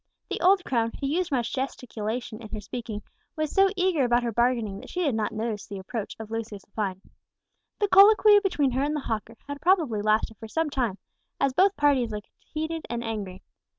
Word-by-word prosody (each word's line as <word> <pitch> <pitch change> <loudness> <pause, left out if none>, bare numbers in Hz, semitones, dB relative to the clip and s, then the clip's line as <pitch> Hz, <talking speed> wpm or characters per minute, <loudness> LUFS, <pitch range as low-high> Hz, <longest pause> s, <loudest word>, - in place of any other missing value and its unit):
The - - -2
old 375 +1 +4
crone, 230 -3 0
who - - -3
used 335 +5 0
much 245 -4 0
gesticulation 240 -3 -4
in 215 -1 -6
speaking, 215 -1 -6 0.3
was 310 -1 -2
so 390 0 +5
eager 360 -6 +2
about 240 0 +3
her 235 - -1
bargaining 235 -4 +1
that - - -11
she 360 - -2
did 285 -6 +1
not 220 -1 -1
notice 215 -1 -3
the 200 - -6
approach 200 +3 -5
of 220 -1 -8
Lucius 220 -3 -5
Lepine. 195 -3 -4 0.7
The 410 - +1
colloquy 415 +1 +7
between 305 -9 +1
her 260 +2 0
and 295 +2 0
the 300 - -2
hawker 225 -1 -4
had 285 0 -6
probably 320 - +2
lasted 215 +1 +1
for 225 - -9
some 320 +6 -1
time, 240 -8 -1 0.4
as 275 - +2
both 385 +6 +3
parties 280 -5 +3
looked 210 -1 -7
heated 315 +1 -5
and 235 0 -3
angry. 205 -5 -5
240 Hz, 195 wpm, -26 LUFS, 220-310 Hz, 0.7 s, colloquy